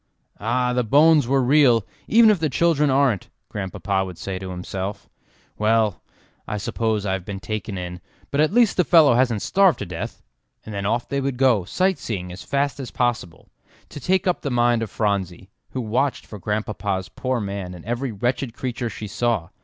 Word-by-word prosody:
"Ah! 125 +3 0
the 125 0 +1
bones 150 +4 +5
were 135 0 +2
real, 125 -5 +4 0.2
even 225 0 +6
if 200 - +1
the 155 -1 0
children 150 +1 +2
aren't," 130 -7 +2 0.2
Grandpapa 95 0 -2
would 90 -3 -7
say 95 -1 -5
to 95 0 -6
himself. 95 +2 -5 0.5
"Well, 110 -1 +2 0.5
I 105 - -2
suppose 110 0 -1
I 95 - 0
have 95 -2 -3
been 100 +1 -6
taken 105 -1 -4
in, 90 0 -6 0.3
but 145 - +2
at 155 - +3
least 235 -1 +3
the 180 - +5
fellow 160 -6 +6
hasn't 120 -4 +2
starved 195 -4 +4
to - - -5
death." 85 -2 -6 0.4
And 110 - -7
then 100 -1 -2
off 120 +3 0
they 140 0 -1
would 135 -2 -2
go 120 -8 +3
sight 185 - +1
seeing 90 -5 -4
as 90 - -9
fast 140 0 -1
as 130 - -5
possible, 120 -9 -2 0.4
to - - -8
take 185 +7 +1
up 180 -2 +1
the 140 - -2
mind 120 -2 +2
of 115 - -3
Phronsie, 95 -3 -2 0.2
who 130 - -4
watched 125 +5 -1
for 105 - -10
Grandpapa's 105 -2 -2
poor 130 -1 -2
man 100 -3 -5
in 85 - -12
every 120 +3 -2
wretched 120 +3 -2
creature 120 -2 -3
she 110 - -7
saw. 105 -4 -1
115 Hz, 190 wpm, -23 LUFS, 100-135 Hz, 0.5 s, even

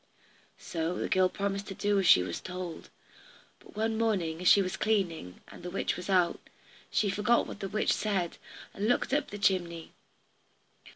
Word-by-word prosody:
So 165 +1 -3
the - - -2
girl 185 0 +3
promised 200 0 -3
to 195 - -6
do 205 +1 +1
as 190 - +1
she 90 - +7
was 95 - -5
told, 180 -2 -7 0.7
but - - -18
one 220 +1 -1
morning 180 -8 0
as 180 - 0
she 200 - +7
was 185 - -3
cleaning, 175 - -1
and - - -12
the 180 - -6
witch 190 - -1
was 180 +2 -7
out, 180 -3 +3 0.5
she 205 -2 +1
forgot 210 +4 +2
what - - -8
the 195 - -4
witch 215 - +1
said, 195 -5 -1 0.3
and 205 +2 -2
looked 245 +2 +1
up 295 - +1
the 205 - -6
chimney. 175 -5 0
190 Hz, 180 wpm, -30 LUFS, 175-205 Hz, 0.7 s, she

